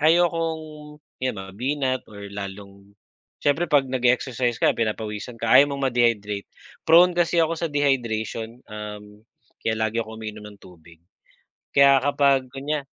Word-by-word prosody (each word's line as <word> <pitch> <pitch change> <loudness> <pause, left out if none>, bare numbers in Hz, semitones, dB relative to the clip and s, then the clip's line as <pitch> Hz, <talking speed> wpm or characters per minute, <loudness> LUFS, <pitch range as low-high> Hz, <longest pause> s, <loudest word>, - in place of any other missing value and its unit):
ayokong 160 -2 0 0.2
'yon 130 -1 -1
mabinat 130 +7 -2
or 100 -1 -10
lalong 100 0 -9 0.5
siyempre 145 +4 +2
'pag 145 -3 +4
nag-e-exercise 125 -1 0
ka - - +3
pinapawisan 110 +1 -3
ka 115 0 -1
ayaw 135 +3 +7
mong 140 - -2
ma-dehydrate. 105 -4 0 0.4
Prone 175 +3 +7
kasi 175 0 +1
ako 165 +1 -2
sa 170 - -1
dehydration, 120 -5 -2
uhm, 105 0 -9 0.4
kaya 110 - 0
lagi 110 +1 -1
ako 110 -1 -7
uminom 110 -1 -8
ng 105 - -14
tubig. 85 -2 -17 0.7
Kaya 140 0 +6
kapag 140 -2 +3
kunya 140 +1 -3
120 Hz, 135 wpm, -23 LUFS, 105-145 Hz, 0.7 s, ayaw